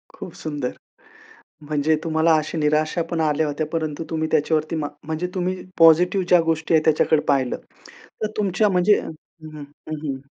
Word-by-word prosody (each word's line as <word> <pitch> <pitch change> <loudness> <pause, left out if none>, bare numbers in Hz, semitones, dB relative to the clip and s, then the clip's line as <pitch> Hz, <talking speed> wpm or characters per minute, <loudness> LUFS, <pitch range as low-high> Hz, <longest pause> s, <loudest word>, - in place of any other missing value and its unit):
खूप 175 - -9
सुंदर. 145 -5 -4 0.9
म्हणजे 150 +1 0
तुम्हाला 160 0 +2
अशा 155 +2 -4
निराशापण 155 +2 0
आल्या 155 0 +1
होत्या 150 +1 -2
परंतु 160 -1 -3
तुम्ही 160 -1 -1
त्याच्यावरती 155 +1 +1
मा 150 -2 -2 0.2
म्हणजे 160 +3 -2
तुम्ही 185 0 -1 0.2
पॉझिटिव्ह 180 +3 +5
ज्या 175 -1 +6
गोष्टी 160 +1 0
आहेत 155 - +3
त्याच्याकडे 155 -1 +3
पाहिलं. 135 -3 +1 0.7
तर 215 - 0
तुमच्या 205 +1 +2
म्हणजे 185 +3 +3
हं, - - -7 0.5
हं, 145 - -8 0.2
हं, 155 - -3
हं. 135 -1 -4
160 Hz, 155 wpm, -22 LUFS, 150-170 Hz, 0.9 s, ज्या